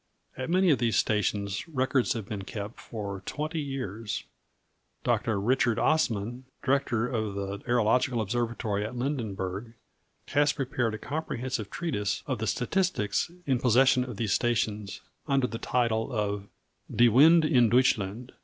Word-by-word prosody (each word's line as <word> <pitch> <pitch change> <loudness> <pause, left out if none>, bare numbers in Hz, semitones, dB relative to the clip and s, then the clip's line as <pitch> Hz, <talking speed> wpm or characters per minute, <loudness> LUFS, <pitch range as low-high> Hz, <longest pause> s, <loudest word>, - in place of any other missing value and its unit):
At 130 +3 -4
many 185 0 +4
of 135 - +3
these 115 -2 +1
stations 105 - 0
records 130 -4 +1
have 115 -4 -5
been 105 -2 -4
kept 105 +3 -6
for 100 -4 -6
twenty 155 +2 -3
years. 115 -6 -4 0.8
Dr. 105 -3 +1
Richard 120 +2 +2
Assman, 120 -6 +1 0.2
director 125 -4 +1
of 110 -5 -2
the 100 0 -4
aerological 120 +1 +2
observatory 110 -1 -1
at 110 +4 -5
Lindenburg, 115 -5 -3 0.5
has 145 0 +3
prepared 130 -5 -1
a - - -5
comprehensive 130 -5 -4
treatise 130 - -2
of 130 -5 -2
the 110 - -2
statistics 165 - 0 0.2
in 130 -3 +1
possession 130 +1 +4
of 125 -5 -7
these 110 -3 0
stations, 105 -4 -1 0.3
under 135 -2 +2
the 115 -1 -4
title 115 -1 0
of 105 -3 -2 0.5
Die 120 - +6
Winde 155 +8 +6
in 125 -7 +4
Deutschland. 120 -2 +1
120 Hz, 140 wpm, -28 LUFS, 105-130 Hz, 0.8 s, Die